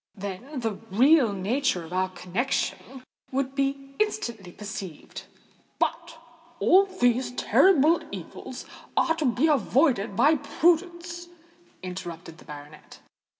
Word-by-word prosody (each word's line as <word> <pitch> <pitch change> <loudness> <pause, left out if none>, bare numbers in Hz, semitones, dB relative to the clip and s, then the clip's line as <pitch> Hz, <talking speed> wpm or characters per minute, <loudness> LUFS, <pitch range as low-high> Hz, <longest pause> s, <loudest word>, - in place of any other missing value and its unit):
Then, 210 +8 -6
the 220 -4 -3
real 255 +4 +5
nature 200 -1 -1
of 165 - -10
our 185 0 +1
connexion 225 +7 -3 0.3
would 270 0 -1
be 275 0 -2
instantly 235 - -2
perceived——" 200 -6 -8 0.5
"But - - -2 0.4
all 390 +2 +5
these 245 -8 +1
terrible 330 +2 +4
evils - - -8 0.3
are 325 - +3
to 310 - -1
be 250 +3 +2
avoided 260 -6 +2
by 305 +8 +4
prudence," 345 +2 0 0.6
interrupted 175 -2 -7
the - - -16
baronet. 150 0 -12
250 Hz, 110 wpm, -26 LUFS, 190-305 Hz, 0.6 s, real